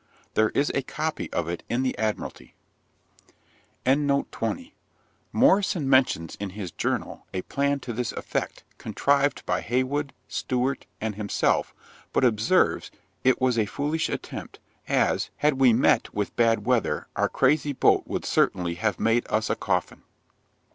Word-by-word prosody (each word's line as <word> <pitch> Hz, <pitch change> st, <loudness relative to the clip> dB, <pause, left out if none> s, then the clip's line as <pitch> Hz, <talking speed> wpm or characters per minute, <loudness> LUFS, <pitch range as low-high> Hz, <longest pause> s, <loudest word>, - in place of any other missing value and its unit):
There 110 Hz, 0 st, +3 dB
is 145 Hz, -, +2 dB
a 140 Hz, -, +1 dB
copy 155 Hz, +4 st, -4 dB
of 85 Hz, -, -1 dB
it 85 Hz, 0 st, -3 dB
in 120 Hz, +2 st, 0 dB
the 130 Hz, -, 0 dB
Admiralty. 110 Hz, -1 st, -4 dB, 2.8 s
Morrison 190 Hz, -6 st, +3 dB
mentions, 130 Hz, -, +2 dB
in 100 Hz, -1 st, -3 dB
his 95 Hz, -2 st, -6 dB
Journal, -, -, -3 dB
a 90 Hz, -, -2 dB
plan 140 Hz, 0 st, 0 dB
to 120 Hz, -, -5 dB
this 120 Hz, +1 st, -2 dB
effect, -, -, -4 dB, 0.2 s
contrived 140 Hz, 0 st, +1 dB
by -, -, 0 dB
Heywood, 130 Hz, +4 st, -1 dB, 0.2 s
Stewart, 130 Hz, +1 st, -2 dB
and 110 Hz, -1 st, -2 dB
himself, 100 Hz, 0 st, 0 dB, 0.4 s
but -, -, +2 dB
observes, 110 Hz, -2 st, +2 dB, 0.3 s
'it 130 Hz, 0 st, +4 dB
was 125 Hz, -2 st, +2 dB
a 105 Hz, -, +1 dB
foolish 150 Hz, +8 st, -1 dB
attempt, -, -, -6 dB, 0.3 s
as, -, -, +1 dB
had 145 Hz, -2 st, +2 dB
we 130 Hz, -2 st, +7 dB
met 115 Hz, +3 st, +3 dB
with 105 Hz, -1 st, -2 dB
bad 115 Hz, -1 st, +2 dB
weather, 125 Hz, -2 st, +1 dB
our -, -, +1 dB
crazy 150 Hz, -1 st, +2 dB
boat -, -, +4 dB
would -, -, -3 dB
certainly 85 Hz, -2 st, +1 dB
have 105 Hz, +5 st, -1 dB
made 115 Hz, +2 st, +2 dB
us 110 Hz, +1 st, 0 dB
a -, -, +1 dB
coffin.' 90 Hz, -3 st, -2 dB
125 Hz, 140 wpm, -26 LUFS, 110-140 Hz, 2.8 s, we